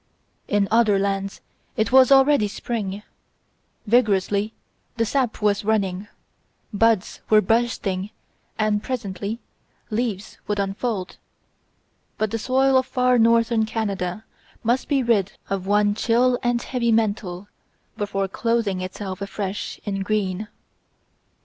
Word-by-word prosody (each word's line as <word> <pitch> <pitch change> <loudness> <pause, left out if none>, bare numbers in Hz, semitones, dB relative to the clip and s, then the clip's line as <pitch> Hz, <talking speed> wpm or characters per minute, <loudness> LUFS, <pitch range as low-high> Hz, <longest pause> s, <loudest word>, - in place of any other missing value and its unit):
In 205 -1 +2
other 220 -3 +4
lands 195 0 -2 0.4
it 220 0 +1
was 260 0 +6
already 270 -4 +5
spring; 205 -2 -4 0.8
vigorously 210 -2 +2 0.5
the 230 - +2
sap 245 -2 -1
was 205 -1 +2
running, 200 -2 0 0.7
buds 225 -1 +1
were 215 - +7
bursting 210 -3 0 0.5
and 215 -1 +1
presently 210 -3 -4 0.5
leaves 220 -3 -3
would 210 - -1
unfold; 200 0 -2 1.0
but 215 -1 -1
the 225 - -2
soil 265 +3 +3
of 260 - -3
far 250 -1 +2
northern 230 0 +4
Canada 200 -2 -3 0.4
must 240 +3 +1
be 275 -3 +2
rid 215 -5 +1 0.2
of 190 -1 -2
one 205 0 +3
chill 245 +3 +2
and 240 -1 0
heavy 240 -3 0
mantle 205 -4 0 0.5
before 195 -1 -2
clothing 225 -2 -1
itself 185 +1 -6
afresh 200 0 -4
in 195 -2 -2
green. 205 0 -1
215 Hz, 120 wpm, -23 LUFS, 195-235 Hz, 1.0 s, were